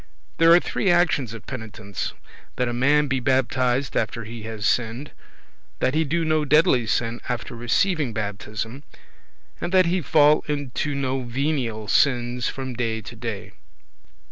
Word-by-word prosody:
There 165 Hz, 0 st, +6 dB
are 170 Hz, -, +8 dB
three 190 Hz, -, -1 dB
actions 175 Hz, -8 st, +2 dB
of 115 Hz, -, -11 dB
penitence; 110 Hz, -5 st, -6 dB, 0.4 s
that 125 Hz, -, 0 dB
a 120 Hz, -, -2 dB
man 145 Hz, +5 st, +3 dB
be 135 Hz, -1 st, 0 dB
baptized 130 Hz, 0 st, +1 dB
after 115 Hz, +1 st, -1 dB
he 115 Hz, +1 st, -8 dB
has 110 Hz, -1 st, -5 dB
sinned; 120 Hz, +6 st, 0 dB, 0.7 s
that 130 Hz, -, 0 dB
he 160 Hz, +1 st, +2 dB
do 165 Hz, +3 st, -1 dB
no 155 Hz, -1 st, +2 dB
deadly 140 Hz, -5 st, +3 dB
sin 115 Hz, +1 st, -1 dB
after 120 Hz, 0 st, -4 dB
receiving 145 Hz, -, +1 dB
baptism; 110 Hz, +3 st, -5 dB, 0.8 s
and 175 Hz, -, -3 dB
that 185 Hz, -1 st, +5 dB
he 175 Hz, +2 st, +1 dB
fall 150 Hz, +1 st, +4 dB
into 145 Hz, -1 st, -2 dB
no 135 Hz, -1 st, -1 dB
venial 120 Hz, -4 st, -2 dB
sins 125 Hz, -1 st, +2 dB
from 130 Hz, -1 st, -5 dB
day 115 Hz, -2 st, -2 dB
to -, -, -10 dB
day. -, -, -6 dB
130 Hz, 150 wpm, -23 LUFS, 115-150 Hz, 0.8 s, are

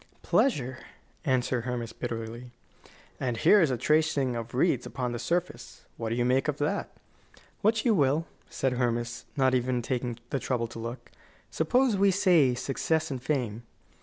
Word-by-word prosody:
"Pleasure," 130 Hz, -, +1 dB, 0.5 s
answered 125 Hz, -3 st, +1 dB
Hermas, 120 Hz, -2 st, -3 dB
bitterly. 115 Hz, 0 st, -5 dB, 0.7 s
"And 125 Hz, -3 st, -1 dB
here 210 Hz, -, +6 dB
is 160 Hz, -, +3 dB
a 125 Hz, -, 0 dB
tracing 150 Hz, -2 st, +2 dB
of 115 Hz, +1 st, -5 dB
wreaths 135 Hz, -2 st, +2 dB
upon 125 Hz, -2 st, -3 dB
the 120 Hz, -, -4 dB
surface. 170 Hz, +8 st, -3 dB
What 115 Hz, -1 st, -4 dB
do 115 Hz, -, -1 dB
you 120 Hz, 0 st, +1 dB
make 130 Hz, +2 st, +2 dB
of 150 Hz, -2 st, -1 dB
that?" 150 Hz, +8 st, -1 dB, 0.7 s
"What 220 Hz, +2 st, +2 dB
you 235 Hz, -, +5 dB
will," 150 Hz, -2 st, +2 dB, 0.2 s
said 130 Hz, -1 st, -1 dB
Hermas, 120 Hz, -1 st, -1 dB
not 130 Hz, -1 st, +3 dB
even 125 Hz, -1 st, +1 dB
taking 125 Hz, -2 st, -2 dB
the 135 Hz, -, 0 dB
trouble 125 Hz, -3 st, -1 dB
to 115 Hz, -, -8 dB
look. 115 Hz, +3 st, -7 dB, 0.4 s
"Suppose 250 Hz, -4 st, +2 dB
we 200 Hz, +1 st, +4 dB
say 175 Hz, -9 st, +4 dB
success 155 Hz, +5 st, -1 dB
and 130 Hz, -2 st, -4 dB
fame?" 120 Hz, -6 st, -2 dB
130 Hz, 165 wpm, -28 LUFS, 120-155 Hz, 0.7 s, here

